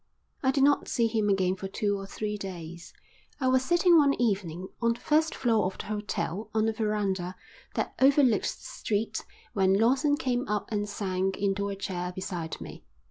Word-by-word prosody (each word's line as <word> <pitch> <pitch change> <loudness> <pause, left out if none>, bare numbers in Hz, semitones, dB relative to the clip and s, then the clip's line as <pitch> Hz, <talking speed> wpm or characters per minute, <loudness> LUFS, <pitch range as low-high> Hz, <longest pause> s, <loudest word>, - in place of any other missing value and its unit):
I 265 - +2
did 270 0 +3
not 285 +1 +3
see 235 - +1
him 220 -2 +1
again 190 -2 +2
for 195 0 -5
two 205 +1 -1
or 195 0 -6
three 210 +1 -3
days. 175 -4 -7 0.5
I 260 - +1
was 260 0 +3
sitting 345 +2 +5
one 280 -2 +4
evening 190 -6 -1
on 235 0 +3
the 235 - -12
first 310 +4 +2
floor 225 -5 +2
of 190 - -6
the - - -6
hotel 205 -2 -3
on 220 0 +3
a 225 - +1
verandah 200 -4 -1 0.4
that - - -1
overlooked 270 -3 +4
the - - -18
street 220 - -2 0.3
when 190 -1 +3
Lawson 265 +7 +3
came 250 -2 -1
up 210 +1 -2
and 205 -1 -1
sank 190 -1 -1
into 200 0 0
a 200 - -3
chair 180 -2 -3
beside 180 -4 -5
me. - - -9
210 Hz, 190 wpm, -28 LUFS, 190-245 Hz, 0.5 s, sitting